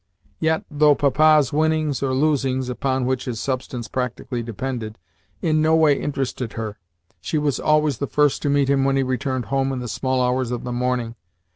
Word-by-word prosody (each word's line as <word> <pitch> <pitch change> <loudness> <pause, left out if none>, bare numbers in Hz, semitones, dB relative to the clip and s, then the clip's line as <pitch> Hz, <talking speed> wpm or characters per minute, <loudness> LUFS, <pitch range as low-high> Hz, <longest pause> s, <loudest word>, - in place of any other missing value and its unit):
Yet, 160 0 +1
though 150 0 +4
Papa's 150 0 +4
winnings 155 -2 +1
or 135 -1 0
losings 135 -3 +1
(upon 130 +1 -1
which 130 0 -1
his 120 -4 -4
substance 125 -2 -3
practically 125 -1 -3
depended) 115 -1 -5 0.5
in 155 -1 +2
no 160 +1 +4
way 160 -2 +5
interested 135 -4 -3
her, 110 -2 -5 0.4
she 155 - -2
was 145 -2 0
always 150 -4 +2
the 140 - -2
first 150 0 +2
to 145 - 0
meet 140 -1 +2
him 140 -1 +2
when 135 0 +2
he 135 - +2
returned 130 -1 -2
home 135 0 +1
in 135 - -3
the 125 -1 -5
small 130 +2 -1
hours 125 0 0
of 120 -1 -4
the 125 - -4
morning. 125 -1 -1
135 Hz, 185 wpm, -22 LUFS, 125-145 Hz, 0.5 s, way